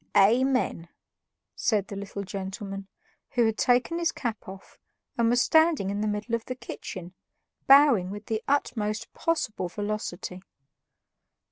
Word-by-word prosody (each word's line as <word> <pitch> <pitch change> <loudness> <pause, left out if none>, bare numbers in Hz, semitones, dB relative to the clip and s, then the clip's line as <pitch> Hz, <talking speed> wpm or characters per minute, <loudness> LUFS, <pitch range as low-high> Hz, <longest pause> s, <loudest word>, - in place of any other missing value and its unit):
"Amen," 235 -4 +3 0.7
said 205 -4 +1
the 200 - -7
little 200 0 -5
gentleman, 195 +1 -6 0.5
who 240 -1 +4
had 220 -1 +1
taken 250 +7 +2
his 335 -1 +1
cap 230 -4 -4
off 190 0 -11 0.4
and 230 -1 +2
was 245 +1 +4
standing 315 - +3
in 205 +1 -2
the 215 - 0
middle 210 +3 -3
of 230 -1 0
the 255 - -4
kitchen, 185 -7 -8 0.5
bowing 270 -9 +6
with 205 +1 -7
the 220 -1 -2
utmost 225 -6 -1
possible 245 - -1
velocity. 205 -2 -4
215 Hz, 135 wpm, -27 LUFS, 195-245 Hz, 0.7 s, bowing